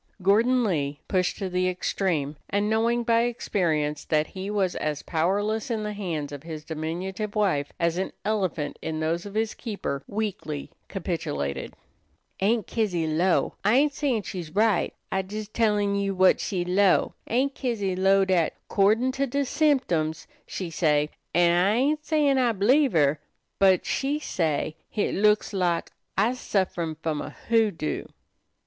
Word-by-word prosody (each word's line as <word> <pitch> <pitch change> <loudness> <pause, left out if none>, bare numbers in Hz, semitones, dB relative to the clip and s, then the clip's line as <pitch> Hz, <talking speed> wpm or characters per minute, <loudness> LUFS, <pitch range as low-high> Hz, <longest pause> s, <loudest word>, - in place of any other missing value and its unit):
Gordon 235 +6 +4
Lee, 145 -8 -1
pushed 185 -2 0
to 195 - -3
the 185 0 +1
extreme, 175 -5 -1
and 205 +1 +1
knowing 230 +2 +2
by 230 0 +3
experience 160 -11 -1
that 155 -1 +2
he 190 +4 -6
was 195 -3 0
as 150 -1 -2
powerless 205 +9 0
in 220 -2 -1
the 210 0 -3
hands 165 -8 -3
of 145 -1 -7
his 155 -1 -7
diminutive 180 +7 -4
wife 180 -9 +1
as 170 +1 +1
an 190 - -2
elephant 185 -8 -1
in 160 -1 -3
those 165 +4 -1
of 200 - -10
his 220 0 0
keeper, 200 - -4
weakly 200 -9 -4 0.2
capitulated. 70 - -3 0.6
"Aunt 215 +1 +2
Kizzy 190 -8 -1
'low' 165 +4 +1
I 210 +4 +4
ain't 290 +2 +4
sayin' 270 -8 0
she's 175 -5 -6
right; 215 -3 +3 0.2
I's 190 0 -2
jes 215 0 -4
tellin' 210 -3 +1
you 200 -1 -1
what 185 0 +5
she 180 -3 -2
'low' 190 +1 +3
Aunt 265 +4 +1
Kizzy 210 -9 -2
'low' 195 +1 +4
dat, 180 -4 +1
'cordin' 220 +6 +3
to 275 +1 -1
de 280 +3 0
symtems, 245 - +1 0.2
she 180 -3 -5
say', 150 -2 +2 0.2
an' 175 -1 +5
I 200 +3 +3
ain't 295 +5 +1
sayin' 295 -4 +2
I 245 -2 +3
b'lieve 255 +8 +3
her, 150 -2 +3 0.4
but 190 -2 +4
she 280 +2 0
say' 160 - -1
hit 210 - -1
looks 210 +2 +3
to 200 - -4
her - - -1
lak 175 -2 0 0.3
I's 235 +6 +2
sufferin' 175 -7 -1
f'om 155 -1 -3
a - - -5
hoodoo." 220 -9 0
195 Hz, 160 wpm, -26 LUFS, 165-220 Hz, 0.6 s, what